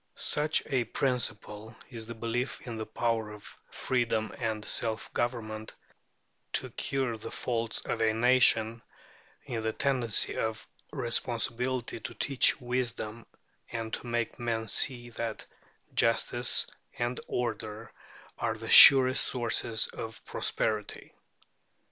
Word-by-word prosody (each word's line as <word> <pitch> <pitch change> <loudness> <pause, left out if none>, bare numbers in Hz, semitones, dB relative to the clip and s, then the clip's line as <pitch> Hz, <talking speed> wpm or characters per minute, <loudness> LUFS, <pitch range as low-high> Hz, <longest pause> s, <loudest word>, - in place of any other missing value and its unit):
Such 150 +1 +2
a 130 -3 0
principle 115 -3 -2 0.2
is 115 -3 -7
the 115 - -7
belief 120 +3 -3
in 120 -2 -6
the 110 -1 -5
power 110 0 -1
of 105 -1 -12
freedom 120 -3 -1
and 110 -3 -3
self 110 -1 -3
government 110 -3 -3 0.8
to - - +1
cure 130 -4 -2
the 110 +1 -8
faults 115 -2 -3
of 115 - -2
a 110 0 +3
nation, 115 -1 +3 0.6
in 115 -2 -4
the 110 0 -2
tendency 125 -6 +1
of 110 -1 -3 0.3
responsibility 120 +1 -1
to - - -8
teach 135 0 +3
wisdom, 120 -3 -3 0.4
and 115 -1 -5
to - - -5
make 120 0 -2
men 115 -2 -2
see 120 +1 +1
that 115 -1 -5 0.5
justice 115 +1 +1 0.3
and 120 +1 -2
order 110 -2 -4 0.5
are - - -1
the - - -6
surest 130 -1 +9
sources 115 -2 0
of 110 0 -8
prosperity. 105 -2 -1
115 Hz, 120 wpm, -29 LUFS, 110-125 Hz, 0.8 s, surest